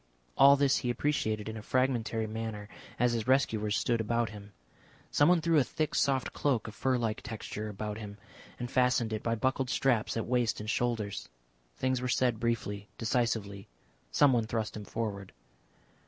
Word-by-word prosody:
All 140 +1 +8
this 140 -1 +3
he 125 - -2
appreciated 115 -5 -1
in 110 - -5
a - - -6
fragmentary 115 -2 0
manner 110 -1 -5 0.3
as 125 0 +2
his 115 0 -2
rescuers 110 -6 +2
stood 115 -2 +1
about 115 0 0
him. 100 -1 -11 0.6
Someone 170 +3 +4
threw 165 -1 +3
a - - +4
thick 155 +3 -2
soft 135 -2 +1
cloak 130 -7 0
of 110 - -7
fur 130 +3 +1
like 115 -3 -2
texture 110 -1 -6
about 105 +1 -5
him, 105 -2 -8 0.4
and 120 0 -5
fastened 125 -3 +2
it 110 - -2
by 115 0 0
buckled 130 +2 0
straps 120 -5 +1
at 115 - -1
waist 120 -2 +1
and 105 +1 -3
shoulders. 115 -5 -2 0.5
Things 130 -1 0
were 125 - -2
said 125 -2 +1
briefly, 105 -4 -2
decisively. 110 -4 -1 0.4
Someone 125 -6 +3
thrust 110 -1 -2
him 105 -1 -7
forward. 100 -4 -4
115 Hz, 170 wpm, -30 LUFS, 110-130 Hz, 0.6 s, All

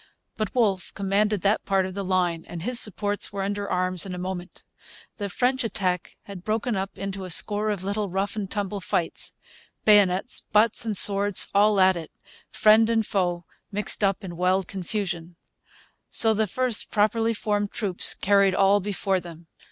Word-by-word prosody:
But 215 0 -4
Wolfe 200 -6 0
commanded 200 +1 0
that 205 +2 +1
part 195 -1 0
of 185 - -6
the 200 +1 -4
line, 180 -3 -1
and 170 -2 -8
his 245 +3 +2
supports 205 0 -1
were 200 -1 -4
under 200 0 -3
arms 185 -1 +1
in 185 -2 -3
a - - -7
moment. 180 0 -7 0.5
The 205 -2 -4
French 255 +6 0
attack 190 -5 -3
had 195 -3 -10
broken 220 +2 -2
up 195 +1 -5
into 195 0 -5
a 185 - -7
score 210 +5 +2
of 200 -3 -3
little 200 +1 -3
rough 195 +3 -3
and 205 -3 -4
tumble 205 -1 -4
fights 170 -2 -1 0.5
bayonets, 205 0 +3
butts, 215 +2 +2
and 215 -3 +2
swords 200 0 +7
all 205 0 +3
at 190 0 +4
it; 165 -2 -7 0.4
friend 220 +1 +4
and 225 -1 +1
foe 175 -4 -2 0.3
mixed 210 +1 -3
up 195 +1 0
in 175 -3 -8
wild 185 +1 0
confusion. 180 -3 -5 0.8
So 225 -1 +3
the 215 0 0
first 250 +2 0
properly 225 +2 +1
formed 205 -1 -2
troops 195 -5 0
carried 200 -1 +2
all 195 +1 +3
before 195 -1 -2
them. 170 -1 -12
200 Hz, 175 wpm, -24 LUFS, 185-210 Hz, 0.8 s, swords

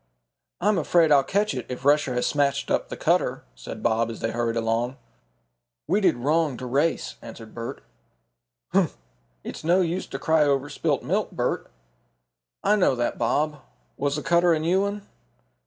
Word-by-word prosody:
"I'm 205 0 +2
afraid 165 0 +3
I'll 140 -2 +6
catch 205 +7 0
it, - - -5
if 125 +1 -6
Rusher 145 -3 +3
has 125 - 0
smashed 140 -1 0
up - - 0
the - - -6
cutter," - - +1
said 60 0 -9
Bob 115 +1 +2
as 115 - -7
they 115 - -2
hurried 115 -1 -1
along. 115 +3 -1 0.9
"We 195 +7 +1
did 195 - +4
wrong 145 +2 +1
to 130 - -6
race," 145 +6 0
answered 110 -2 -11
Bert. 115 0 -6 0.9
"Humph! - - +1 0.5
it's - - -7
no 175 +4 +3
use 180 +2 -1
to - - -5
cry 160 -1 +2
over 140 0 +1
spilt - - -1
milk, - - 0
Bert." - - -2 0.9
"I 210 +1 +4
know 180 -9 +3
that, 120 -1 -2
Bob. 145 +6 0 0.3
Was 140 0 -1
the 150 - -4
cutter 170 0 +4
a 160 - +1
new 175 +5 +2
one?" 200 0 -3
145 Hz, 170 wpm, -25 LUFS, 125-170 Hz, 0.9 s, I'll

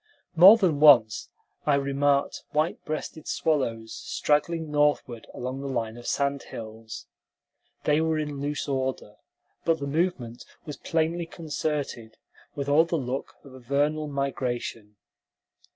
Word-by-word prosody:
More 190 +7 +10
than 175 -9 +1
once 125 -8 +6 0.4
I 145 - +5
remarked 140 0 +1
white 155 +2 0
breasted 155 0 -5
swallows 115 -8 -1
straggling 155 +1 -1
northward 145 -6 +1
along 130 +2 -5
the 140 - -5
line 115 -4 -2
of 120 0 -10
sand 140 0 0
hills. 110 0 -9 0.8
They 150 +1 +3
were 160 -1 +1
in 150 -2 -3
loose 145 +1 -3
order, 130 -6 -3 0.5
but 165 -1 +2
the 140 - -5
movement 140 -6 -2 0.2
was 150 -3 -7
plainly 165 +1 -1
concerted, 150 -8 -4 0.4
with 140 -1 -3
all 150 +3 +5
the 170 - -2
look 130 -1 -4
of 135 - -14
a 130 - -11
vernal 145 +4 0
migration. 125 -6 -3
140 Hz, 135 wpm, -26 LUFS, 125-155 Hz, 0.8 s, More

